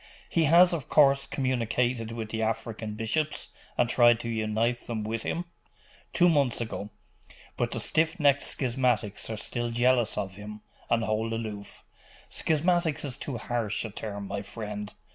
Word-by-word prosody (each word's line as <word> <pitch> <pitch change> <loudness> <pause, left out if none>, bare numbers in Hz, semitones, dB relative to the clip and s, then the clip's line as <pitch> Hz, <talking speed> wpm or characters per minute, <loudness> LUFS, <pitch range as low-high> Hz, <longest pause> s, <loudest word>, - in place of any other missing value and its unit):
He 165 -2 +2
has, 175 +4 +7
of 155 -7 -4
course, 140 -2 +5
communicated 120 -2 0
with 115 -2 -5
the 110 - -2
African 110 -1 -2
bishops, 145 +8 -1 0.3
and 120 - +3
tried 120 -1 +5
to 115 - -4
unite 110 +2 0
them 110 -3 -3
with 110 +1 -2
him?' 175 +8 -2 0.7
'Two 175 - +4
months 140 -7 +2
ago. 110 -3 -4 0.7
But - - 0
the - - -3
stiff 160 +3 +1
necked 140 -2 +4
schismatics 125 -6 0
are 110 - -3
still 120 +2 -3
jealous 120 0 +2
of 95 -2 -3
him, 105 +1 -8 0.3
and 115 -1 +2
hold 110 +1 -1
aloof.' 105 -3 -5 0.5
'Schismatics 160 -1 +1
is 130 -3 -4
too 140 -3 -5
harsh 115 -2 -2
a 110 - -6
term, 100 -1 -5
my 100 +1 -3
friend. 105 0 -5
115 Hz, 160 wpm, -28 LUFS, 110-135 Hz, 0.7 s, has